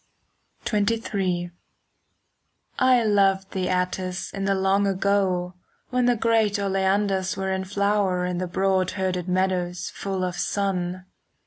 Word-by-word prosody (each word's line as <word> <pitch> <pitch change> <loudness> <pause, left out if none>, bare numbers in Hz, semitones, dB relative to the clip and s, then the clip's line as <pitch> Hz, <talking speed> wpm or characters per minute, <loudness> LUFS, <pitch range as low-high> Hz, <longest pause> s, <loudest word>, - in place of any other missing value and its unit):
XXIII 200 -5 -1 1.3
I 255 -2 +4
loved 195 -2 +2
thee, 185 -1 -2
Atthis, 185 0 -2
in 195 0 -3
the 195 0 +2
long 195 +1 +2
ago, 190 -2 +1 0.4
When 250 -1 +2
the 245 - +4
great 225 -2 +2
oleanders 195 -1 0
were 190 0 -2
in 190 0 -2
flower 200 -2 +1
In 180 -1 -2
the 185 - -2
broad 190 0 +1
herded 185 -2 -1
meadows 180 -1 -1
full 195 -1 -3
of 180 -1 -2
sun. 185 -2 -2
190 Hz, 125 wpm, -24 LUFS, 185-200 Hz, 1.3 s, I